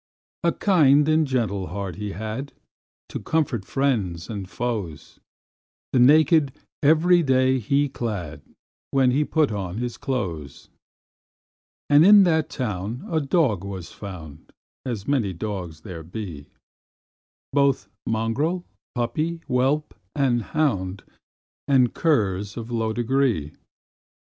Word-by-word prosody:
A - - +3
kind 150 -7 +4
and 155 -1 +3
gentle 110 -8 -1
heart 95 0 -5
he 105 -1 -4
had, 110 +7 -5 0.6
To - - -5
comfort 135 -11 -1
friends 105 -11 -1
and 100 -4 -6
foes; 105 -11 -4 0.7
The 130 - +4
naked 150 +2 +5 0.3
every 160 +4 +5
day 130 -2 +3
he 140 +5 +1
clad, 105 - -5 0.5
When 135 -2 +3
he 140 +4 +2
put 150 -3 +1
on 100 -2 -4
his 120 0 -3
clothes. 90 - -4 1.2
And 145 +1 +6
in 205 +2 +8
that 160 -4 +2
town 110 -1 -4
a 160 - +2
dog 135 - +1
was 95 -3 -7
found, 80 -7 -10 0.4
As 115 -5 -4
many 125 -9 +1
dogs 90 -4 -5
there 90 -5 -8
be, 85 -4 -7 1.1
Both 140 -8 +2 0.2
mongrel, 130 +11 -1 0.3
puppy, 155 +8 -2
whelp, 135 +3 0 0.2
and 130 -4 +2
hound, 100 -9 -1 0.6
And 130 -4 +3
curs 105 - 0
of 115 0 -6
low 115 -2 0
degree. 120 - 0
120 Hz, 120 wpm, -24 LUFS, 100-145 Hz, 1.2 s, in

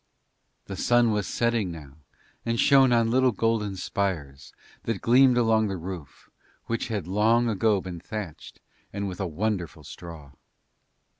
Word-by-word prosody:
The 95 - -6
sun 120 +3 +3
was 105 -2 -1
setting 115 -5 0
now 75 -4 -11 0.5
and 115 0 -1
shone 135 -2 +5
on 115 -1 +3
little 130 +1 +4
golden 110 -2 0
spires 80 -9 -3 0.3
that 115 -4 -2
gleamed 125 +1 +5
along 110 -2 +3
the 95 -2 -3
roof 85 -4 -8 0.4
which 115 0 -2
had 105 -7 -3
long 110 +6 +2
ago 110 -1 +2
been 90 -2 -7
thatched 95 -2 -8 0.3
and 100 0 -3
with 90 -2 -6
a 95 - -1
wonderful 85 -3 -3
straw. 80 -2 -10
105 Hz, 145 wpm, -26 LUFS, 90-115 Hz, 0.5 s, shone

